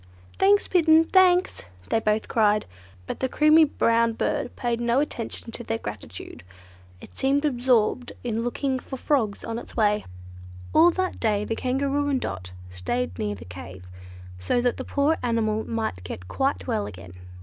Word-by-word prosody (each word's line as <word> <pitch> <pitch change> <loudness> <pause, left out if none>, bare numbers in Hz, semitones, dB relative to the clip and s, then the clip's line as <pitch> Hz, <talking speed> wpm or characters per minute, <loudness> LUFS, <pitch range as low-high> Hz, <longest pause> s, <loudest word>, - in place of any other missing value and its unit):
"Thanks, 400 +1 +4
Bittern! 325 -3 +5
thanks!" 365 - +3 0.2
they 225 - +2
both 215 0 0
cried, 210 -2 +2 0.4
but - - -5
the 260 - -1
creamy 305 +3 +5
brown 230 -4 +2
bird 235 - -2
paid 240 -2 -2
no 235 +2 +2
attention 240 -5 -4
to 240 - -7
their 225 -1 -2
gratitude: - - -8 0.6
it - - -14
seemed 280 +2 +2
absorbed 245 -3 +1
in 230 -1 -2
looking 260 +2 -1
for 265 - -7
frogs 245 -7 0
on 230 0 -3
its - - -12
way. 210 -1 +2 0.7
All 330 +2 +7
that 370 +1 -2
day 210 -2 +1
the 225 - -2
Kangaroo 275 +3 0
and 270 -2 +1
Dot 95 - -5 0.2
stayed 90 +2 -3
near 105 -1 -2
the 90 -4 -11
cave, 90 +1 -10 0.5
so 90 - 0
that 245 0 0
the - - -4
poor 295 +3 +1
animal 220 -3 0
might 220 - -3
get 90 0 -7
quite 270 - -1
well 220 -5 -1
again. 90 0 -10
235 Hz, 165 wpm, -25 LUFS, 210-280 Hz, 0.7 s, All